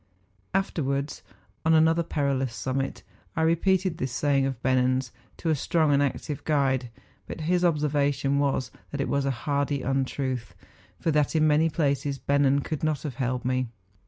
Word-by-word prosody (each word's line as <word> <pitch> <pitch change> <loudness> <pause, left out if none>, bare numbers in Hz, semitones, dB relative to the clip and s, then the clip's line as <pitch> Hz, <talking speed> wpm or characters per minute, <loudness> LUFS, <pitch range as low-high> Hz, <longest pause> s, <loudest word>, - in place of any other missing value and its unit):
Afterwards, 140 -7 -1 0.4
on 160 0 +4
another 160 +1 +4
perilous 140 -6 -1
summit, 135 +1 -3 0.3
I 160 - +1
repeated 180 +2 +2
this 130 -1 -2
saying 135 0 +2
of 135 -3 -4
Bennen's 130 0 +2 0.3
to 165 - -1
a - - +3
strong 155 +1 +2
and 140 - +4
active 145 +1 -2
guide; 135 -4 +1 0.4
but - - -6
his 175 +3 +1
observation 145 -3 +1
was 140 -2 0 0.2
that 145 - -5
it 140 - 0
was 140 -1 +1
a - - +1 0.2
hardy 140 -2 0
untruth, 130 -5 -2 0.4
for 165 - 0
that 150 0 +1
in 155 -1 +4
many 155 +2 +4
places 140 -2 0
Bennen 140 0 +2
could 155 -2 -4
not 155 -3 0
have 140 -6 -5
held 125 -1 -1
me. 130 0 0
140 Hz, 160 wpm, -26 LUFS, 135-155 Hz, 0.4 s, on